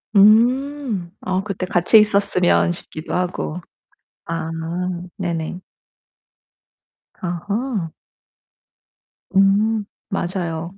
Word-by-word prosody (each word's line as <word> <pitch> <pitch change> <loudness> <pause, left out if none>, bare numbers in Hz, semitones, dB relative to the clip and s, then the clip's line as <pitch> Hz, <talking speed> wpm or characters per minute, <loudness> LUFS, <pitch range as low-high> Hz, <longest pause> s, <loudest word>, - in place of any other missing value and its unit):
음 235 0 +4
어, 185 +1 -1
그때 195 -3 -3
같이 180 +4 +4
있었으면 200 -4 +3
싶기도 160 -2 -8
하고. 180 -2 -2 0.7
아 165 -1 -3 0.7
네네. 175 -1 -3 1.6
아하. 200 +3 -2 1.4
음 205 +2 +3 0.2
맞아요. 175 -1 -3
190 Hz, 135 characters per minute, -21 LUFS, 175-210 Hz, 1.6 s, 음